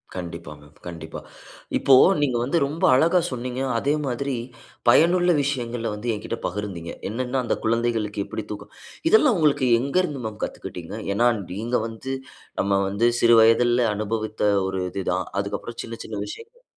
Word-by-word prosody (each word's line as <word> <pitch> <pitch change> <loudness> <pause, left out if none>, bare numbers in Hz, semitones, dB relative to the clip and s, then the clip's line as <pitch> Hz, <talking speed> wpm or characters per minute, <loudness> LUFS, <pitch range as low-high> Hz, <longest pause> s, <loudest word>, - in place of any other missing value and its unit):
கண்டிப்பாங்க 85 -4 -7 0.2
கண்டிப்பா. 85 -2 -7 0.6
இப்போ 135 - +4 0.3
நீங்க 130 -5 +1
வந்து 140 +7 0
ரொம்ப 150 +4 -5
அழகா 170 +6 +4
சொன்னீங்க. 125 +1 -4 0.2
அதே 140 +5 +1
மாதிரி 135 +2 -2 0.5
பயனுள்ள 175 +6 +5
விஷயங்கள 120 -4 -2
வந்து 115 +3 -4
எங்கிட்ட 110 +2 -5
பகிர்ந்தீங்க. 90 -4 -5 0.2
என்னன்னா 125 +3 -2
அந்த - - 0
குழந்தைகளுக்கு 110 -3 0
எப்படி 110 - -6
தூக்கம். 105 0 -8 0.4
இதெல்லாம் 295 - +5
உங்களுக்கு 145 -4 +3
எங்கருந்து 140 +1 0
மேம் 110 -1 -6
கத்துக்கிட்டீங்க? 90 +3 -6 0.2
ஏன்னா 120 +4 +3 0.3
நீங்க 115 +5 -2
வந்து 115 +4 -6 0.5
நம்ம 100 0 +1
வந்து 100 +4 +1
சிறு 120 0 +6
வயதில்ல 120 +1 +4
அனுபவித்த 110 0 -3 0.2
ஒரு 95 -1 -2
இது 95 +1 -4
தான். 95 0 -1
அதுக்கப்புறம் 105 +3 -4
சின்ன 115 0 -7
சின்ன 110 - -6
விஷயங்கள் 470 +2 -11
115 Hz, 145 wpm, -24 LUFS, 105-135 Hz, 0.6 s, சிறு